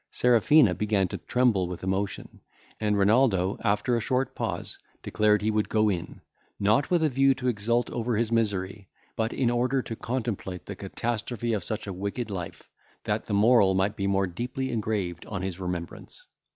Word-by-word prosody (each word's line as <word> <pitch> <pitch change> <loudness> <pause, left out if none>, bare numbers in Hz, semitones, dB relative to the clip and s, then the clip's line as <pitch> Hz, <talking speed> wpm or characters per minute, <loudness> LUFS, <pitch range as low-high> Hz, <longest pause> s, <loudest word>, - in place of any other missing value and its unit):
Serafina 125 -1 +4
began 100 0 +1
to - - -5
tremble 120 -8 +1
with 90 0 -7
emotion; 95 +1 -3 0.4
and 105 -1 +1
Renaldo, 100 -2 +3
after 105 +3 +1
a - - +1
short 130 +4 -1
pause, - - -4 0.2
declared 105 -1 +2
he 110 - +2
would 105 0 0
go 110 -1 +3
in, 90 -4 -4 0.4
not 110 +8 +2
with 175 -3 +2
a 155 - +3
view 135 0 +3
to 130 -1 -4
exult 120 +1 +1
over 120 -1 -1
his 115 0 0
misery, 100 -3 -1 0.3
but 110 0 -1
in 125 -3 +1
order 125 +2 +1
to 115 - -6
contemplate 110 -7 -4
the - - -6
catastrophe 120 0 -3
of 105 -4 -1
such 110 +3 -4
a 100 - -5
wicked 100 +4 -4
life, 90 -3 -6 0.4
that - - -2
the 100 - -1
moral 105 -2 +5
might 95 +3 +1
be 100 - -3
the 100 - +1
more 95 0 +2
deeply 125 +8 -4
engraved 105 -6 -2
on 100 -3 -4
his 95 -1 -4
remembrance. 90 -2 -6
105 Hz, 180 wpm, -27 LUFS, 95-120 Hz, 0.4 s, moral